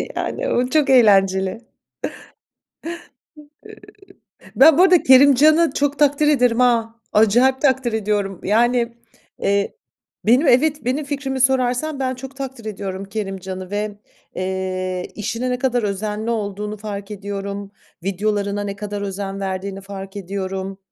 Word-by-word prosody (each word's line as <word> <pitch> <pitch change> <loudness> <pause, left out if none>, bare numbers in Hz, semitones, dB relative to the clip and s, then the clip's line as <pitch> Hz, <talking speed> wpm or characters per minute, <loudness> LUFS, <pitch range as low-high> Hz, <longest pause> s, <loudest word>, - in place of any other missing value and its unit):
yani, - - -3
o 250 - +1
çok 300 0 +2
eğlenceli. 200 -2 +3 1.9
Eee, - - -11 0.8
Ben 305 +3 +7
bu - - +7
arada 365 -2 +5
Kerimcan'ı 285 +4 +6
çok 285 0 0
takdir 295 0 +3
ederim, 250 -5 +3
ha, 230 -2 +2 0.2
acayip 245 +5 +4
takdir 260 -4 +1
ediyorum, 205 -3 -1
yani, 235 +3 +2 0.5
eee, 200 0 +1 0.5
benim 250 +8 +4
evet, 295 +3 +3
benim 260 +5 -1
fikrimi 275 -2 -3
sorarsan 265 +3 +1
ben 260 -1 -1
çok 265 +2 -10
takdir 265 -4 -7
ediyorum 195 -2 -5
Kerimcan'ı 190 -2 -6
ve, 205 0 -3 0.4
eee, 185 -1 -3
işine 230 +4 -3
ne 250 - -1
kadar 250 -2 0
özenli 210 +2 -3
olduğunu 210 -1 -3
fark 205 -1 -7
ediyorum. 200 0 -5 0.3
Videolarına 205 +1 -1
ne 200 -1 -4
kadar 205 0 -5
özen 195 0 -4
verdiğini 195 0 -4
fark 195 0 -9
ediyorum. 195 0 -5
215 Hz, 125 wpm, -20 LUFS, 195-260 Hz, 1.9 s, Ben